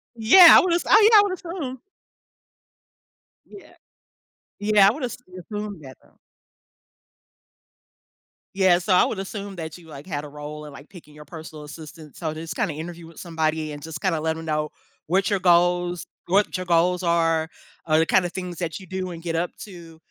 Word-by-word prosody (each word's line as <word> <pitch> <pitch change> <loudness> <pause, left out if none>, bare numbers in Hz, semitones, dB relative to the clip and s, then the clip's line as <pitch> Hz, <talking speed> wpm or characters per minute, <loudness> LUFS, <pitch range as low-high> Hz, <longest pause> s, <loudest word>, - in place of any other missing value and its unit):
Yeah, 240 +11 +8
I - - +9
would 355 -1 0
oh, 420 +5 +5
yeah, 425 - +9
I - - +7
would 400 -2 -2
assume. 335 -8 -6 1.7
Yeah. 400 - -14 0.9
Yeah, 205 -1 +4
I - - +5
would 280 +1 -7
have 240 - -3 0.4
assumed 205 -5 -6
that 130 -1 -12
though. - - -27 2.4
Yeah, 190 -2 +4
so 185 +2 0
I 180 - +5
would 200 - -4
assume 200 0 -7
that 160 0 -7
you, 170 - -17
like, 145 0 -11
had 145 -5 -4
a 150 - -9
role 150 +1 -9
in, 150 - -11
like, 140 +1 -14
picking 160 -6 -15
your 150 0 -13
personal 155 -1 -10
assistant, 155 0 -12
so, 160 -3 -4
just, 160 +1 -7
kinda, 155 - -1
interview 165 +2 -8
with 165 - -14
somebody 160 -2 -2
and, 145 0 -8
just, 160 0 -7
kinda, 170 -5 0
let 160 +1 -1
them 160 - -8
know 150 -1 -2 0.4
what 190 +4 +1
your 200 -2 0
goals 175 0 +2 0.2
what 200 +1 +2
your 185 - -5
goals 180 +1 +1
are, 165 -2 +1 0.4
or 155 0 +3
the, 160 - +3
kinda, 180 +1 +2
things 180 -1 -7
that 170 -1 -4
you - - -12
do 185 0 -5
and 165 -1 -9
get 170 -1 -3
up 175 +2 -1
to, 170 -5 -12
170 Hz, 190 wpm, -23 LUFS, 160-195 Hz, 2.4 s, I